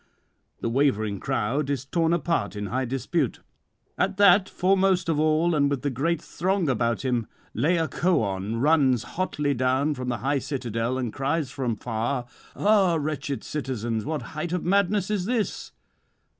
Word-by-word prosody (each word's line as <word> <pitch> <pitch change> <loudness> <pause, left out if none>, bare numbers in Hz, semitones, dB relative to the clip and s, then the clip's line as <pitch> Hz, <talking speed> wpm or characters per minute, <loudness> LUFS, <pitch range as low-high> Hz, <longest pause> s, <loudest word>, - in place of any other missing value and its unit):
The - - -1
wavering 110 -7 +1
crowd 135 +4 -1
is 140 -2 -2
torn 165 +3 +1
apart 165 - 0
in 105 0 -4
high 130 +5 -1
dispute. 135 +3 -1 0.6
'At - - +1
that, 200 -1 +6
foremost 185 -1 +2
of 155 -2 +1
all 155 +2 +3
and 145 -2 +3
with 140 -1 -3
a 140 - +1
great 150 +6 0
throng 185 +2 -1
about 120 0 0
him, 120 -4 0 0.3
Laocoön 120 - 0
runs 135 -4 +3
hotly 150 -6 -1
down 130 +4 +1
from 125 -2 -4
the 120 - -1
high 135 +5 0
citadel, 125 -3 -2
and 125 -4 -3
cries 140 0 -1
from 125 -5 -2
far: 120 +3 -2 0.3
"Ah, 200 -4 +3
wretched 145 -2 -3
citizens, 120 -6 -3
what 155 0 -3
height 160 +3 -3
of 180 - -1
madness 200 +1 +2
is 200 -4 0
this? 230 -1 -2
140 Hz, 155 wpm, -25 LUFS, 125-170 Hz, 0.6 s, that